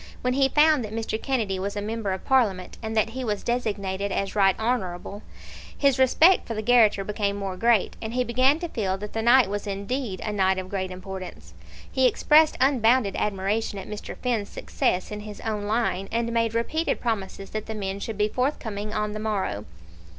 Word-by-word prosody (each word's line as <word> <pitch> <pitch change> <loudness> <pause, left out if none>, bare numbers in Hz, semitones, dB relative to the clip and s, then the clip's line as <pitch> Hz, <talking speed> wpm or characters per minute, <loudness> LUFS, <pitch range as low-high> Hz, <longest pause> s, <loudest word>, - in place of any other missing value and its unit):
When 250 0 +1
he 270 0 +3
found 300 -2 +4
that 215 0 -6
Mr. 225 -1 -3
Kennedy 220 -9 -1
was 200 +2 -3
a - - -2
member 215 -1 -3
of 190 - -4
Parliament, 210 -9 +1
and 220 0 -4
that 220 +1 +2
he 260 +2 -5
was 210 -4 -2
designated 200 -5 -2
as 195 +1 -2
Right 195 -2 +3
Honourable, 205 -4 -2 0.6
his 275 -2 +2
respect 315 +8 +5
for 230 - -4
the 215 - -3
garrotter 220 -4 +4
became 205 -1 -1
more 195 -2 -4
great, 230 0 +2
and 225 +1 -5
he 250 - +2
began 255 +4 +3
to 345 - -2
feel 195 - -2
that 210 +1 -8
the 225 - -1
night 240 0 +6
was 205 +1 -4
indeed 200 +1 -3
a 210 - -3
night 190 -2 +2
of 185 0 -5
great 190 -1 -2
importance. 185 - -8 0.4
He 260 -1 +4
expressed 310 +4 +4
unbounded 250 -5 +3
admiration 205 +1 -1
at 195 - -7
Mr. 210 -1 -7
Finn's 235 -5 -1
success 180 +2 -1
in 210 - -4
his 210 0 -9
own 210 -2 -3
line, 205 -3 0
and 235 0 -1
made 230 -1 +1
repeated 315 +8 0
promises 195 -4 -3
that 215 -1 -4
the 220 - -5
men 195 -1 -3
should 220 +1 -5
be 210 0 +2
forthcoming 215 -4 -2
on 210 0 -1
the 215 - -5
morrow. 195 - -2
215 Hz, 200 wpm, -25 LUFS, 195-240 Hz, 0.6 s, night